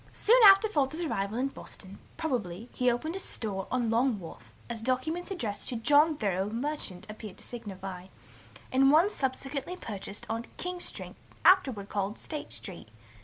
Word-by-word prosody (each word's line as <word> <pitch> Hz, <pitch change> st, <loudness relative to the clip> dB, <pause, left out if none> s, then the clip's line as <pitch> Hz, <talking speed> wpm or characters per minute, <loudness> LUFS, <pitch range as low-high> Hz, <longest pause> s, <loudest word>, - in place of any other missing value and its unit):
"Soon 485 Hz, +4 st, +5 dB
after 390 Hz, +2 st, +8 dB
Father's 310 Hz, -3 st, 0 dB
arrival 210 Hz, -, -1 dB
in 265 Hz, +2 st, +1 dB
Boston, 195 Hz, -7 st, -10 dB, 0.2 s
probably, 235 Hz, -, -3 dB
he 250 Hz, 0 st, +2 dB
open'd 310 Hz, +8 st, -1 dB
a -, -, -2 dB
store 200 Hz, -, -3 dB
on 240 Hz, -2 st, 0 dB
Long 235 Hz, 0 st, +2 dB
Wharf, 170 Hz, -4 st, -11 dB, 0.2 s
as 235 Hz, -2 st, -5 dB
documents 260 Hz, -, -1 dB
addressed 220 Hz, -, -3 dB
to 250 Hz, -, -2 dB
'John 290 Hz, +6 st, +4 dB
Thoreau, 195 Hz, -3 st, 0 dB
merchant,' 230 Hz, -6 st, -3 dB
appear 215 Hz, -2 st, -8 dB
to -, -, -13 dB
signify, 195 Hz, -5 st, -7 dB, 0.6 s
and 270 Hz, +1 st, +5 dB
one 335 Hz, +7 st, +5 dB
subsequently 270 Hz, +3 st, -3 dB
purchased 205 Hz, -, -7 dB
'on 230 Hz, +1 st, -3 dB
King 360 Hz, 0 st, -4 dB
Street, -, -, -7 dB, 0.3 s
afterward 265 Hz, -, +5 dB
called 205 Hz, +1 st, -2 dB
State 305 Hz, -2 st, -6 dB
Street.' 180 Hz, -, -6 dB
245 Hz, 160 wpm, -30 LUFS, 205-305 Hz, 0.6 s, after